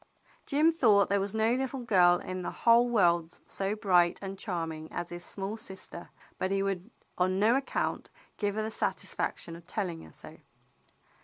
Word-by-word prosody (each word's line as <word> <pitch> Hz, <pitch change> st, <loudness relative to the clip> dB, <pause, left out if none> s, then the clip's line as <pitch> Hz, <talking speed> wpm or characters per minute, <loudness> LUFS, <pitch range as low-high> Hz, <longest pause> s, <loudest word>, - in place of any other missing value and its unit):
Jim 305 Hz, +3 st, +4 dB
thought 220 Hz, -11 st, +4 dB
there 200 Hz, -, +3 dB
was 195 Hz, +1 st, -2 dB
no 220 Hz, +2 st, +2 dB
little 265 Hz, 0 st, -2 dB
girl 180 Hz, -6 st, +5 dB
in 185 Hz, 0 st, -5 dB
the -, -, -3 dB, 0.2 s
whole 235 Hz, +1 st, +6 dB
world 175 Hz, -6 st, +2 dB
so 195 Hz, +2 st, -2 dB
bright 180 Hz, -5 st, +3 dB
and 195 Hz, -1 st, -7 dB
charming 165 Hz, -5 st, -4 dB
as 175 Hz, -, -4 dB
his 175 Hz, 0 st, -7 dB
small 200 Hz, +4 st, -5 dB
sister, 190 Hz, -4 st, -10 dB, 0.3 s
but 185 Hz, -, 0 dB
he 195 Hz, 0 st, +1 dB
would 195 Hz, -2 st, -3 dB, 0.3 s
on 185 Hz, +1 st, +2 dB
no 220 Hz, +4 st, +4 dB
account 270 Hz, 0 st, -2 dB, 0.3 s
give 205 Hz, -1 st, -1 dB
her 215 Hz, -, -1 dB
the 220 Hz, -, -3 dB
satisfaction 170 Hz, -5 st, -3 dB
of 170 Hz, 0 st, -14 dB
telling 180 Hz, -5 st, -3 dB
her 80 Hz, -, -13 dB
so. -, -, -12 dB
195 Hz, 175 wpm, -30 LUFS, 175-220 Hz, 0.3 s, whole